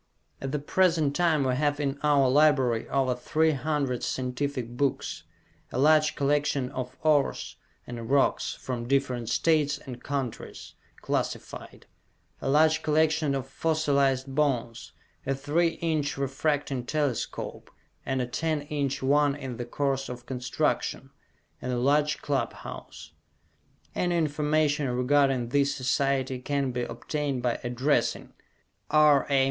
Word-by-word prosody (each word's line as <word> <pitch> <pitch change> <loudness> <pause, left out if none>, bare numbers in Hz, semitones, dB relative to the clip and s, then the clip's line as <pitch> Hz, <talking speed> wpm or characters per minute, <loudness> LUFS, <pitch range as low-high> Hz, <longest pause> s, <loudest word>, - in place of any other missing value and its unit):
At 135 - -3
the 150 - 0
present 160 -1 +2
time 165 -5 +2
we 130 -1 +1
have 145 +2 0
in 140 -1 -2
our 145 -3 +4
library 135 -4 +3
over 130 -2 +1
three 155 +6 +1
hundred 140 -3 -1
scientific 125 -1 -2
books; 140 +2 -2 0.5
a - - -4
large 155 +2 +4
collection 140 -2 0
of 130 -1 -5
ores 150 -3 +1 0.3
and 115 -2 -7
rocks 140 0 +2
from 120 -2 -5
different 130 -4 0
states 150 -2 +2
and 125 -4 -10
countries, 135 -5 -5 0.3
classified; - - -4 0.6
a - - -2
large 155 +2 +4
collection 155 -1 +2
of 135 -1 -3
fossilized 140 -3 +1
bones; 130 -5 -1 0.4
a 135 - +1
three 160 +5 +1
inch 155 -4 0
refracting 140 -1 -1
telescope, 145 -6 -3 0.3
and 130 -1 -1
a - - -1
ten 155 +4 -2
inch 145 -2 -2
one 145 +1 +3
in 130 -4 -6
the 120 - -4
course 135 +1 -1
of 125 -1 -8
construction; 125 0 -2 0.5
and 125 - -3
a 125 - -1
large 145 +4 +1
club 135 -5 -1
house. - - -10 0.8
Any 175 -1 0
information 150 -2 +1
regarding 125 0 +2
this 140 +1 +2
society 130 0 0
can 140 0 -1
be 125 0 -2
obtained 140 +1 -3
by 120 -2 0
addressing 125 +4 0 0.6
R. 150 -2 +5
A. 140 -1 +3
140 Hz, 130 wpm, -27 LUFS, 130-150 Hz, 0.8 s, R